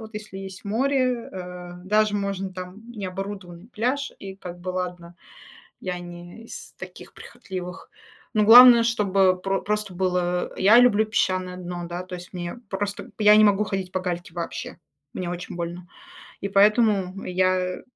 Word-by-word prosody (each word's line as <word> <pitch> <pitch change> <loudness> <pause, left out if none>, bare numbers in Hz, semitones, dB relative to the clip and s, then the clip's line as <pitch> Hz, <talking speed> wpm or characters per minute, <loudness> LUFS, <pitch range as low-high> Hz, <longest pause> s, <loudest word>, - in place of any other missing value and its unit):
Вот 220 -1 -11
если 210 -2 -7
есть 190 0 -9
море, 255 +2 0
э, 180 -1 -8
даже 210 +1 +2
можно, 195 -1 -2
там, 185 +2 -8
необорудованный 195 -3 -7
пляж 250 +5 -2
и 195 -1 -8
как 175 -2 -9
бы 180 - -7
ладно, 180 -1 -5 0.6
я 180 -1 -4
не 175 +4 -10
из - - -10
таких - - -11
прихотливых, 180 -1 -8 0.4
но 215 -2 +3
главное, 235 +1 +10
чтобы 195 -5 +2
про 195 +1 -1
просто 210 -2 -2
было 180 -1 -1
Я 210 +5 +6
люблю 220 -4 +5
песчаное 185 -4 0
дно, 175 -1 -6
да? 175 +1 -5
То 185 0 -8
есть 180 0 -10
мне 175 +2 -5
просто 200 +1 -3
б - - -17
я 210 -1 +7
не 215 - +7
могу 205 0 +3
ходить 195 -3 -3
по 185 - -2
гальке 175 -2 -4
вообще, 170 -1 -5 0.4
мне 180 - -4
очень 175 0 -6
больно, 175 +1 -5 0.5
и 200 - -3
поэтому 200 -2 +3
я 185 0 0
190 Hz, 160 wpm, -24 LUFS, 180-210 Hz, 0.6 s, главное